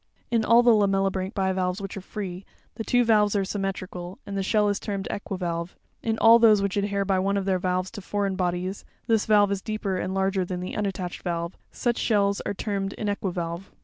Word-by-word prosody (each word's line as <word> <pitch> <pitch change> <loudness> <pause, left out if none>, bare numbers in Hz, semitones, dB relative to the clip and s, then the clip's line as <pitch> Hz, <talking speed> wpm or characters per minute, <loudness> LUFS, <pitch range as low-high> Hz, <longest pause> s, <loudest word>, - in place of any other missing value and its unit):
In 230 -2 +2
all 230 +2 +6
the 240 - +6
lamellibranch 195 -1 +1
bivalves 190 -1 0
which 195 -1 -6
are 195 - -5
free, 190 -2 -6 0.3
the 225 - -5
two 245 +2 +3
valves 210 -2 +3
are 195 -1 +1
symmetrical, 190 -2 -4
and 200 - -6
the 195 - 0
shell 210 +2 +2
is 205 -1 0
termed 200 -2 -4
equivalve; 175 -3 -4 0.3
in 225 -1 -1
all 230 +1 +7
those 220 -3 +6
which 200 -1 -1
adhere 200 -1 0
by 190 -1 +2
one 200 +2 +1
of 195 - -1
their 190 -2 +1
valves 185 0 -1
to 205 - -8
foreign 200 0 -1
bodies, 180 +1 -2 0.2
this 225 -3 +2
valve 205 -2 +5
is 200 -1 -1
deeper 215 -3 -2
and 185 +1 -3
larger 190 0 +1
than 180 0 -4
the 180 - -5
unattached 190 -3 -3
valve; 170 0 -3 0.2
such 240 -1 -1
shells 200 -3 +2
are 200 - -2
termed 195 -1 -3
inequivalve. 185 -4 -3
195 Hz, 205 wpm, -26 LUFS, 185-205 Hz, 0.3 s, all